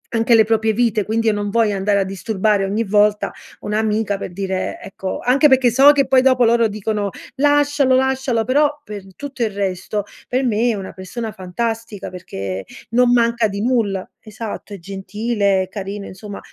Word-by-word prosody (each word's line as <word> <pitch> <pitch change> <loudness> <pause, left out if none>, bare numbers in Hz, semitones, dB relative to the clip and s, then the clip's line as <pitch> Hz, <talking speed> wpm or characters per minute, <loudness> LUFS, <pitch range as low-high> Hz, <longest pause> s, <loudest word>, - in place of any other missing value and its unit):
anche 230 +1 +4
le 220 -2 +6
proprie 220 0 +1
vite, 220 -2 +1
quindi 225 +2 -1
io 220 - +4
non 205 0 -2
voglio 215 -1 +2
andare 200 +1 +1
a 195 - +2
disturbare 195 +1 0
ogni 205 +4 -1
volta 210 +1 +2 0.3
un'amica 210 -1 -1
per 190 - -6
dire, 190 0 -3
ecco 195 -1 -5
anche 275 +5 +4
perché 260 -2 +4
so 270 +5 +7
che 275 -3 +1
poi 260 -1 +5
dopo 255 -2 +4
loro 230 0 +4
dicono: 210 0 -2 0.3
"Lascialo, 290 -1 +3
lascialo". 265 -3 +1
Però 290 +3 +2
per 205 -2 -7
tutto 280 -3 -5
il 225 - +1
resto, 200 +1 -3 0.3
per 255 +1 0
me 235 +1 +1
è 225 - 0
una 195 -1 -7
persona 220 +4 -6
fantastica, 220 +3 -4
perché 95 - -6 0.3
non 245 +1 +4
manca 235 -2 +3
di 200 0 -4
nulla. 215 -6 0 0.2
Esatto, 215 -1 -7
è 195 - -8
gentile, 200 +1 -1
carino, 200 0 -6
insomma, 200 +2 -9
220 Hz, 175 wpm, -19 LUFS, 200-240 Hz, 0.3 s, so